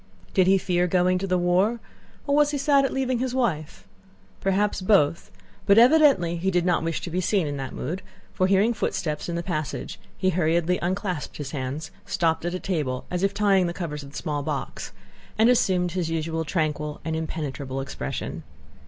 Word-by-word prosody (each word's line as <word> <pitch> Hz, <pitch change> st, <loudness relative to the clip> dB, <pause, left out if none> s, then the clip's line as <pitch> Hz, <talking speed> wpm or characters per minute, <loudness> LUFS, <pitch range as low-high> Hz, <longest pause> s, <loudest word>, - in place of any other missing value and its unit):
Did 185 Hz, -2 st, +4 dB
he 195 Hz, +1 st, +6 dB
fear 180 Hz, -1 st, +1 dB
going 180 Hz, +1 st, +2 dB
to 195 Hz, -, -3 dB
the 185 Hz, -1 st, +2 dB
war, 185 Hz, +6 st, +2 dB, 0.5 s
or 280 Hz, -, +1 dB
was 295 Hz, 0 st, +4 dB
he 295 Hz, -, -1 dB
sad 275 Hz, 0 st, +3 dB
at -, -, -1 dB
leaving 260 Hz, -2 st, 0 dB
his 255 Hz, 0 st, -2 dB
wife?—perhaps 195 Hz, -, -3 dB
both, 185 Hz, -5 st, +2 dB, 0.4 s
but 200 Hz, +1 st, +6 dB
evidently 240 Hz, -, +5 dB
he 185 Hz, +3 st, 0 dB
did 175 Hz, -2 st, +1 dB
not 175 Hz, -2 st, +2 dB
wish 165 Hz, -1 st, -2 dB
to 175 Hz, -, -6 dB
be 180 Hz, +2 st, 0 dB
seen 190 Hz, -1 st, +1 dB
in 145 Hz, -1 st, -3 dB
that 135 Hz, -1 st, -5 dB
mood, 180 Hz, +4 st, -4 dB, 0.3 s
for 185 Hz, -, +2 dB
hearing 200 Hz, +5 st, +3 dB
footsteps 155 Hz, -7 st, -2 dB
in 170 Hz, -, -2 dB
the 170 Hz, -, -2 dB
passage 155 Hz, -5 st, -4 dB, 0.2 s
he 185 Hz, -1 st, +1 dB
hurriedly 170 Hz, +1 st, +1 dB
unclasped 180 Hz, -3 st, -3 dB
his 140 Hz, -3 st, -5 dB
hands, 140 Hz, +3 st, -4 dB
stopped 165 Hz, -3 st, 0 dB
at 175 Hz, +1 st, -1 dB
a -, -, -3 dB
table 145 Hz, -10 st, -2 dB
as 180 Hz, -1 st, -1 dB
if 195 Hz, 0 st, +2 dB
tying 200 Hz, -3 st, +3 dB
the 170 Hz, -, -4 dB
cover 170 Hz, -5 st, -4 dB
of 145 Hz, -2 st, -7 dB
the 140 Hz, -, -9 dB
small 150 Hz, -4 st, -2 dB
box, -, -, -4 dB, 0.5 s
and 225 Hz, +3 st, +5 dB
assumed 180 Hz, -7 st, +2 dB
his 175 Hz, -2 st, -2 dB
usual 165 Hz, 0 st, -2 dB
tranquil 150 Hz, -2 st, -2 dB
and 160 Hz, -1 st, -1 dB
impenetrable 140 Hz, -4 st, -4 dB
expression. 135 Hz, -, -5 dB
180 Hz, 190 wpm, -25 LUFS, 160-195 Hz, 0.5 s, he